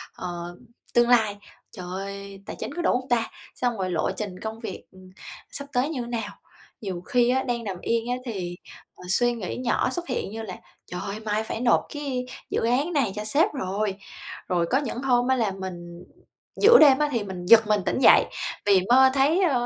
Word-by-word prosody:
ờ, 175 0 -6 0.4
tương 240 0 +4
lai: 220 -4 +3 0.3
"Trời 185 -5 -8
ơi, 200 0 -7
tài - - -7
chính - - -5
có 350 - -3
đủ 340 - +2
hông 255 - -12
ta?" 235 -2 +1 0.3
Xong 245 -2 -1
rồi: 185 -1 -2
"Lộ 170 - 0
trình 195 -4 -5
công 220 0 -6
việc, 225 -5 -7
ừm, 185 0 -16 0.4
sắp 280 - -6
tới 250 +4 +1
như 275 -6 -3
thế 235 - -6
nào?" 225 -3 -3 0.5
Nhiều 190 -5 -4
khi 240 +6 +2
á, 260 +1 +2
đang 240 -2 -2
nằm 195 -4 -4
yên 230 +1 -1
á - - +1
thì, 185 -7 -4 0.4
ờ, - - -14
suy 240 +5 +3
nghĩ 215 -6 -5
nhỏ 250 - +1
xuất 345 +6 -5
hiện 245 -6 -3
như 225 - -5
là 195 -5 -6 0.4
"Trời 180 - -4
ơi, 200 +2 -5
mai 215 0 -1
phải 220 - -5
nộp 245 -1 +4
cái 275 -4 -3 0.2
dự - - -1
án 270 +9 +1
này 270 -9 +1
cho 210 - -4
sếp 305 - +2
rồi!" 200 -5 -2 0.5
Rồi 175 -2 +1
có 260 - +4
những 270 -3 -3
hôm 245 -2 +2
á 260 - +3
là 225 -5 0
mình 175 -2 -8 0.6
giữa 470 +3 +9
đêm 280 -4 +7
á 300 0 +2
thì 235 -5 -1
mình 185 -3 -7
giật 220 +3 +7
mình 210 -2 +2
tỉnh - - 0
dậy, - - +7 0.4
vì 195 -2 +5
mơ 260 +2 +7
thấy, 285 +7 +3
ờ, 260 -9 +2
225 Hz, 215 wpm, -25 LUFS, 195-255 Hz, 0.6 s, giữa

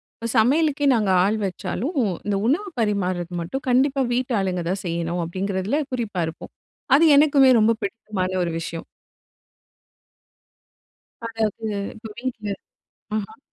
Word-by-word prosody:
இப்ப 230 - -5
சமையலுக்கே 290 +5 +3
நாங்க 210 -4 +1
ஆள் 210 +3 +1
வச்சாலும், 200 - -3 0.3
இந்த 205 -1 0
உணவு 390 +10 +1
பரிமாறுது 185 -5 -1
மட்டும் 265 +12 -5
கண்டிப்பா 270 +2 +3
வீட்டாளுங்க 200 -8 0
தான் 190 +1 -2
செய்யணும், 170 +1 -2
அப்படிங்கிறதில 190 - -1
குறிப்பா 215 -7 -2
இருப்போம். 160 - -9 0.4
அது 310 - +5
எனக்குமே 280 -3 +6
ரொம்ப 215 +1 +4
பிடித்தமான 195 -3 -3
ஒரு 170 - -2
விஷயம். 165 0 -6 2.4
அதாவது 225 -1 -2 0.3
இப்போ 220 0 -9
வீட்டில 230 -5 -4 0.6
ம்ஹ்ம். 215 +1 -5
215 Hz, 115 wpm, -23 LUFS, 185-255 Hz, 2.4 s, எனக்குமே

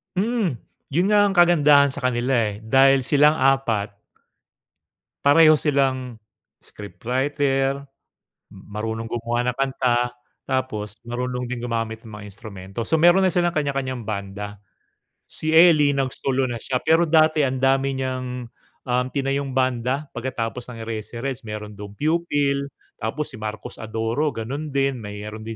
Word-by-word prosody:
Mm. 205 - 0 0.3
'Yun 170 +6 +1
nga 210 - +5
ang 195 - -2
kagandahan 150 -5 +5
sa 140 - -5
kanila 125 0 0 0.2
eh, 105 +2 -12
dahil 135 +3 +4
silang 150 +3 +4
4 120 -8 +1 1.3
pareho 155 +2 +7
silang 130 -5 0 0.4
scriptwriter, 135 - -2 0.7
m - - -14
marunong 110 +2 -4
gumawa 120 +1 -1
ng 125 - -9
kanta, 125 -3 +1 0.3
tapos 115 -5 -3
marunong 125 +1 -3
din 120 -1 -5
gumamit 115 -2 -3
ng 110 - -12
mga 105 0 -9
instrumento. 100 0 -9
So, 160 - +2
meron 175 +3 +6
na - - +3
silang 175 -1 +1
kanya-kanyang 135 -4 -2
banda. 105 0 -5 0.7
Si 155 - -3
Ely 160 -4 +6
nagsolo 135 0 -1
na 120 -1 -4
siya, 125 +2 -2
pero 165 +1 +4
dati 155 -1 +4
andami 135 +1 +1
niyang, 130 -1 -3 0.6
um, 125 0 +1
tinayong 140 0 -1
banda 130 +2 0
pagkatapos 120 -1 -4
ng 115 -2 -8
Eraserheads. 115 +4 -5
Meron 105 0 -6
dun 100 0 -9
Pupil, 145 -2 0 0.3
tapos 130 +7 -3
si - - -9
Marcos 110 +3 -6
Adoro 115 +6 -1
gano'n 140 +7 -5
din. 135 -2 +1
Mayron 105 0 -7
din 115 0 -5
130 Hz, 135 wpm, -23 LUFS, 115-145 Hz, 1.3 s, pareho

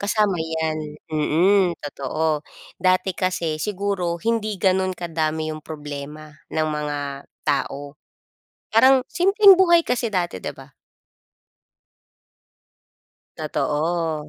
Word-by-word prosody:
kasama 205 -1 +1
'yan. 160 -1 -2 0.3
Mm, 175 +6 +3 0.2
totoo. 150 +2 -2 0.3
Dati 185 0 +2
kasi 175 -4 -1
siguro 190 -4 -2
hindi 220 0 -1
gano'n 185 0 +2
kadami 160 -2 -2
'yong 155 -1 -9
problema 150 0 -7 0.2
ng 155 0 0
mga 150 -1 -3 0.5
tao, 140 +1 -2 0.8
parang 260 +3 +6
simpleng 390 +2 +6
buhay 345 -2 +5
kasi 245 -1 0
dati, 175 -3 -1
'di - - -4
ba? 135 +1 -14 2.7
Totoo. 155 0 -1
170 Hz, 95 wpm, -22 LUFS, 155-200 Hz, 2.7 s, parang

